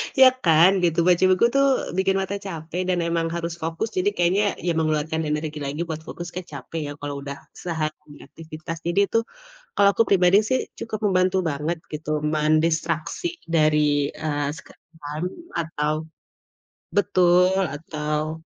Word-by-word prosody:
Ya 265 -1 +9 0.2
kan, 165 +2 +6
gitu. 170 -1 +2
Baca 180 0 +4
buku 185 +5 +4
tuh 275 0 +5 0.3
bikin 190 0 +2
mata 190 +1 -3
capek 165 0 -4
dan 180 -1 +1
emang 165 0 0
harus 170 0 -3
fokus 165 +7 -2
jadi 185 +3 +3
kayaknya 180 +4 +2 0.2
ya 175 - +2
mengeluarkan 155 0 0
energi 150 0 -2
lagi 145 +4 -3
buat 160 -1 -4
fokus 175 0 -6
ke 185 - -2
capek 145 +4 -6
ya, - - -5
kalau 145 -1 -4
udah 140 0 -5 0.2
sehari 155 -3 -5
aktivitas. 160 0 -8
Jadi 175 +3 +1
tuh, 230 0 +3 0.5
kalau 200 0 +5
aku 230 - +4
pribadi 185 0 +5
sih 260 - +2 0.2
cukup 215 -2 -4
membantu 185 -1 +2
banget 150 +4 -2 0.2
gitu 150 0 -5
mendistraksi 155 - 0 0.2
dari 150 -3 +3
eee 145 -2 -2
screen - - -15 0.2
time 150 +4 -3 0.3
atau 155 -2 -1 1.0
betul 180 -2 +4 0.2
atau 155 +1 -3
165 Hz, 150 wpm, -23 LUFS, 155-180 Hz, 1.0 s, Ya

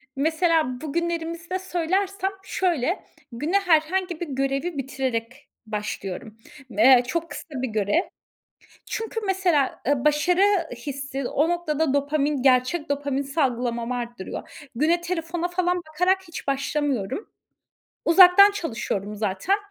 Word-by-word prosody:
Mesela 315 -3 +1
bugünlerimizde 335 +3 -3
söylersem 380 +2 -1
şöyle, 350 -4 0 0.3
güne 300 +12 +1
herhangi 355 0 +1
bir 345 - -4
görevi 275 +4 -1
bitirerek 260 -1 -3 0.2
başlıyorum. 210 0 -5 0.3
Me 245 +3 +6
çok 335 +5 -2
kısa - - -6 0.2
bir 260 - -1
görev. 215 - +1 0.8
Çünkü 450 0 -4
mesela, 360 -8 +1
eee, 280 -2 +1
başarı 300 +5 +3 0.3
hissi 275 +1 -5
o 305 +4 +1
noktada 320 -4 0
dopamin, 285 0 0
gerçek 260 +5 +2
dopamin 285 -1 -1
salgılamam 250 -4 -1
arttırıyor. 240 +3 -6
Güne 320 +7 +2
telefona 345 0 -2
falan 360 0 0
bakarak 360 +5 +2
hiç 330 - -8
başlamıyorum. 275 - -1 0.8
Uzaktan 370 +3 +8
çalışıyorum 230 - -3
zaten. 210 - 0
300 Hz, 110 wpm, -24 LUFS, 255-345 Hz, 0.8 s, Uzaktan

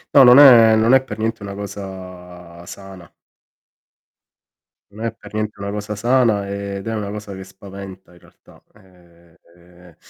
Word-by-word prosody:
No, 140 - +8
non 125 +1 +7
è 115 -6 +7
non 110 +3 +2
è 135 - +5
per 130 - -9
niente 115 0 -3
una 100 -1 -8
cosa 90 -3 -10
sana. 95 -4 -12 1.8
Non 110 +3 -8
è 115 - -2
per - - -15
niente 105 -1 -4
una 100 0 -5
cosa 105 0 -6
sana 115 -3 +1
ed 100 0 -6
è 115 - -3
una 105 -2 -4
cosa 105 -1 -8
che 95 0 -9
spaventa 95 -1 -13
in 90 - -20
realtà. - - -23
Ehm, 85 -2 -24 0.2
ehm, 90 -1 -20
100 Hz, 160 wpm, -19 LUFS, 90-110 Hz, 1.8 s, No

